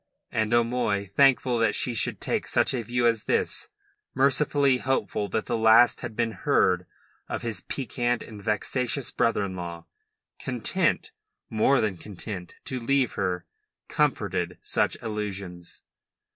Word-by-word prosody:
And 110 0 0
O'Moy, 115 -5 +1
thankful 130 -3 +4
that 110 -2 +2
she 125 - +2
should 115 - +1
take - - -2
such - - +2
a 125 - -1
view 120 +2 -1
as 115 -2 +2
this - - 0 0.5
mercifully 140 0 +3
hopeful 125 -5 -1
that 110 - -1
the - - -1
last 115 +2 +5
had 120 -3 -6
been 115 - 0
heard 90 -2 +1 0.4
of - - -3
his 115 -3 -3
peccant 120 -2 -2
and 105 -3 -10
vexatious 120 +5 -1
brother 115 -3 +1
in 95 -2 -4
law 85 -1 -6 0.5
content, - - 0 0.4
more 120 +5 +3
than 105 -5 -1
content, 95 -1 -8
to 130 - -3
leave 130 +1 +1
her 90 -2 -2 0.4
comforted 95 - 0
such - - +1
illusions. 100 -5 -5
115 Hz, 140 wpm, -26 LUFS, 100-125 Hz, 0.5 s, last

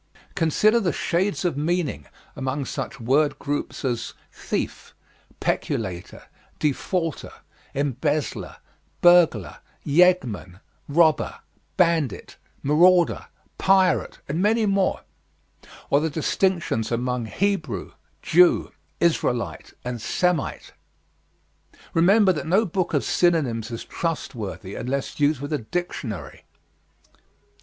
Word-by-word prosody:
Consider 210 +8 +3
the 185 -6 0
shades 190 +3 -1
of 175 - +1
meanings 150 - -1 0.3
among 135 +1 -3
such 135 +2 -5
word 140 +6 +2
groups 145 -1 -4
as 120 -2 -2 0.2
thief, - - -4 0.4
peculator, 95 -5 -3 0.3
defaulter, 160 +2 -2 0.4
embezzler, 145 +2 -2 0.5
burglar, 175 - +4 0.3
yeggman, 140 - +2 0.3
robber, 155 +1 +2 0.4
bandit, 165 - +1 0.3
marauder, 175 +4 +4 0.3
pirate, 190 -3 +3
and 155 +5 -1
many 220 +2 +3
more; 195 -2 +1 0.9
or 140 - +5
the 160 +2 0
distinctions 160 - 0
among 120 0 -1
Hebrew, 200 - -2 0.3
Jew, 175 +1 +4 0.3
Israelite, 125 -8 0
and 120 -2 -4
Semite. 180 - -1 1.2
Remember 190 +4 +5
that 155 - -5
no 195 +7 +3
book 180 -1 -1
of - - +1
synonyms 135 -11 +1
is 115 -1 -6
trustworthy 110 - -4
unless 135 +4 -3
used 145 -1 +2
with 145 +2 -4
a 150 - 0
dictionary. 110 - -5
155 Hz, 100 wpm, -24 LUFS, 125-180 Hz, 1.2 s, or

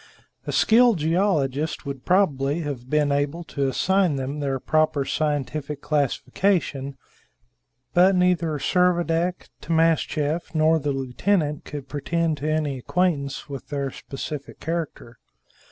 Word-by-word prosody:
A - - -1
skilled 235 -1 +5
geologist 155 -4 0
would 140 -2 -6
probably 155 -5 +2
have 135 -5 -5
been 150 -1 +2
able 145 +4 -1
to 140 -3 -2
assign 185 +4 +2
them 135 +2 -3
their 135 -2 -1
proper 155 -1 +1
scientific 150 -1 -2
classification, 145 -1 0 1.0
but 185 +2 +5
neither 175 -4 +2
Servadac, 175 +1 +1
Timascheff, 160 0 0
nor 160 +1 +4
the 145 -1 -1
lieutenant 145 +4 -1
could 145 -2 -7
pretend 160 +2 -1
to 150 +3 -3
any 150 -4 -1
acquaintance 145 -2 -1
with 140 -2 -7
their 140 -2 -3
specific 140 +2 -7
character. 160 -7 -5
150 Hz, 120 wpm, -24 LUFS, 140-170 Hz, 1.0 s, skilled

